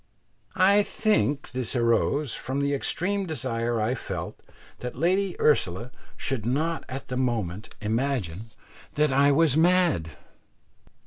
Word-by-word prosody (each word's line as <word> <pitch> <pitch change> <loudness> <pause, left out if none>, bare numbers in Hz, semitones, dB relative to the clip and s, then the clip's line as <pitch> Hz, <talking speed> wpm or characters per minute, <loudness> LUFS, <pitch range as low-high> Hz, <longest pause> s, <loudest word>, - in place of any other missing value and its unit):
I 200 +2 +5
think 205 -9 0
this 125 -1 -2
arose 120 +3 +1
from 135 +2 -3
the 140 0 0
extreme 190 +7 -1
desire 120 -6 -2
I 110 +3 +1
felt - - -6 0.4
that 125 - -6
Lady 185 +4 +1
Ursula 115 - +1 0.3
should 130 -5 -3
not 155 +8 -1
at 130 +1 -6
that 125 - -2
moment 110 -6 -2
imagine 110 -4 -2 0.5
that 150 -1 +2
I 140 +2 +4
was 150 -1 +4
mad. 160 - +2
135 Hz, 125 wpm, -26 LUFS, 115-160 Hz, 0.5 s, I